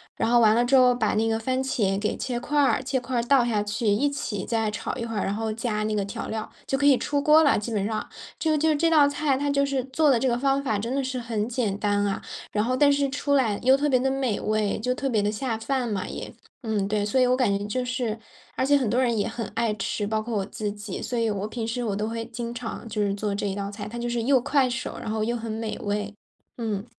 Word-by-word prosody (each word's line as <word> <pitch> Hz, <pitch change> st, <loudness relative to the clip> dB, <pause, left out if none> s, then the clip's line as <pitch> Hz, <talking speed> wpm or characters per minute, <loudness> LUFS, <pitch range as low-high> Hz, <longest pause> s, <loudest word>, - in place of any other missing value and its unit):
然 -, -, 0 dB
后 240 Hz, 0 st, +5 dB
完 220 Hz, -1 st, +5 dB
了 240 Hz, -, +3 dB
之 270 Hz, -, +3 dB
后 250 Hz, -1 st, +6 dB
把 220 Hz, -3 st, 0 dB
那 225 Hz, +1 st, +2 dB
个 225 Hz, 0 st, +1 dB
番 260 Hz, +3 st, -1 dB
茄 200 Hz, -7 st, 0 dB
给 210 Hz, -, -1 dB
切 245 Hz, -2 st, -3 dB
块 295 Hz, +3 st, +1 dB
儿， 270 Hz, -2 st, +3 dB
切 265 Hz, 0 st, 0 dB
块 250 Hz, 0 st, -3 dB
儿 235 Hz, -, 0 dB
倒 255 Hz, -1 st, +4 dB
下 220 Hz, -3 st, +1 dB
去、 210 Hz, +3 st, -3 dB
一 220 Hz, +8 st, +3 dB
起 215 Hz, -8 st, -4 dB
再 225 Hz, -2 st, 0 dB
炒 210 Hz, -, -4 dB
一 235 Hz, -, -4 dB
会 225 Hz, -1 st, -5 dB
儿， 205 Hz, -, 0 dB
然 200 Hz, -, -1 dB
后 220 Hz, 0 st, -2 dB
加 220 Hz, -2 st, -2 dB
那 215 Hz, 0 st, -1 dB
个 200 Hz, -, 0 dB
调 200 Hz, -, -5 dB
料， 220 Hz, -1 st, -4 dB, 0.2 s
就 270 Hz, -, 0 dB
可 285 Hz, -, 0 dB
以 275 Hz, -3 st, +6 dB
出 285 Hz, +2 st, -1 dB
锅 305 Hz, +2 st, +6 dB
儿 320 Hz, -, +5 dB
了， 285 Hz, -, +4 dB
基 230 Hz, +2 st, -5 dB
本 200 Hz, -1 st, 0 dB
上。 215 Hz, 0 st, -3 dB, 0.3 s
就 315 Hz, -2 st, +2 dB
就 315 Hz, +1 st, +3 dB
这 330 Hz, +3 st, +2 dB
道 300 Hz, -3 st, +6 dB
菜， 285 Hz, -2 st, 0 dB
它 285 Hz, +1 st, -1 dB
就 280 Hz, 0 st, +2 dB
是 275 Hz, -2 st, -1 dB
做 290 Hz, +3 st, +2 dB
的 255 Hz, -, +5 dB
这 260 Hz, -, +1 dB
个 240 Hz, -1 st, +1 dB
方 275 Hz, +1 st, +1 dB
法 215 Hz, -6 st, 0 dB
真 235 Hz, +5 st, -2 dB
的 275 Hz, -, 0 dB
是 255 Hz, 0 st, -3 dB
很 225 Hz, -3 st, -2 dB
简 225 Hz, -5 st, -1 dB
单 205 Hz, -1 st, +1 dB
啊， 200 Hz, -1 st, -1 dB, 0.3 s
然 210 Hz, 0 st, +1 dB
后 255 Hz, +1 st, 0 dB
但 285 Hz, 0 st, +5 dB
是 280 Hz, -1 st, +1 dB
出 285 Hz, +1 st, -1 dB
来 220 Hz, -7 st, +2 dB
又 260 Hz, +1 st, +6 dB
特 295 Hz, +1 st, +1 dB
别 255 Hz, -2 st, +4 dB
地 265 Hz, +1 st, +1 dB
美 265 Hz, -6 st, -1 dB
味， 215 Hz, -1 st, 0 dB
就 250 Hz, +3 st, 0 dB
特 275 Hz, 0 st, -2 dB
别 215 Hz, -4 st, +2 dB
地 205 Hz, +1 st, +1 dB
下 225 Hz, 0 st, -2 dB
饭 245 Hz, +2 st, -1 dB
嘛 195 Hz, -3 st, -2 dB
也。 -, -, -7 dB, 0.3 s
嗯 210 Hz, -3 st, 0 dB
对， 210 Hz, 0 st, 0 dB
所 210 Hz, +5 st, +1 dB
以 -, -, +5 dB
我 250 Hz, -, +3 dB
感 205 Hz, -6 st, +2 dB
觉 205 Hz, -, -5 dB
就 250 Hz, +5 st, -2 dB
是 245 Hz, -3 st, -2 dB, 0.4 s
而 -, -, 0 dB
且 285 Hz, +1 st, +5 dB
很 255 Hz, -5 st, 0 dB
多 250 Hz, +4 st, +2 dB
人 235 Hz, -3 st, +1 dB
也 205 Hz, -, 0 dB
很 230 Hz, 0 st, -4 dB
爱 230 Hz, -2 st, +1 dB
吃， 205 Hz, +1 st, -2 dB
包 215 Hz, 0 st, 0 dB
括 230 Hz, 0 st, -4 dB
我 195 Hz, -, -1 dB
自 210 Hz, 0 st, -4 dB
己， 205 Hz, -2 st, -6 dB
所 245 Hz, -, -3 dB
以 230 Hz, -1 st, +1 dB
我 205 Hz, 0 st, -2 dB
平 225 Hz, 0 st, -4 dB
时 245 Hz, +2 st, -2 dB
我 210 Hz, -4 st, -1 dB
都 210 Hz, +1 st, -2 dB
会 230 Hz, 0 st, -3 dB
经 235 Hz, 0 st, -5 dB
常 235 Hz, -1 st, -6 dB
就 210 Hz, 0 st, -2 dB
是 200 Hz, -1 st, +1 dB
做 205 Hz, 0 st, -2 dB
这 205 Hz, -, -2 dB
一 190 Hz, -, -3 dB
道 200 Hz, 0 st, -4 dB
菜， 205 Hz, 0 st, -7 dB
它 235 Hz, -, -7 dB
就 240 Hz, -, -2 dB
是 235 Hz, -1 st, -1 dB
又 270 Hz, +1 st, +4 dB
快 275 Hz, 0 st, +2 dB
手， 260 Hz, +2 st, -4 dB
然 -, -, -5 dB
后 220 Hz, 0 st, -1 dB
又 235 Hz, +2 st, 0 dB
很 225 Hz, -1 st, -5 dB
美 220 Hz, 0 st, -3 dB
味。 205 Hz, 0 st, -2 dB, 0.5 s
嗯。 215 Hz, -2 st, -2 dB
230 Hz, 310 characters per minute, -25 LUFS, 210-260 Hz, 0.5 s, 后